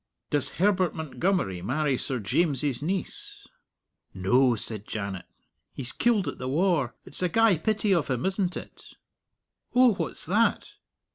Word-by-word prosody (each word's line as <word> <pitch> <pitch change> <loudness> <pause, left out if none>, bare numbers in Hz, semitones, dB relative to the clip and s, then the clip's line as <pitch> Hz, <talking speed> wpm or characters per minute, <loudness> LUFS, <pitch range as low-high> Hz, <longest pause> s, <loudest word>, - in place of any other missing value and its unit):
"Does 145 -2 +1
Herbert 185 -1 +2
Montgomery 160 - -1
marry 140 - 0
Sir 130 +1 -2
James's 140 - 0
niece?" 185 +5 -4 0.7
"No," 120 +7 +3
said 110 -1 -6
Janet; 100 -4 -4 0.5
"he's 130 -2 -4
killed 225 -6 +1
at - - -5
the 130 - -4
war. 155 -4 +1
It's - - -2
a 180 - +2
gey 225 -3 +4
pity 210 +2 +1
of 170 -5 +1
him, 125 -3 -1
isn't 190 -1 0
it? - - -11 0.8
Oh, 250 -2 +6
what's 165 -6 -3
that?" 215 +7 +1
155 Hz, 140 wpm, -27 LUFS, 125-190 Hz, 0.8 s, Oh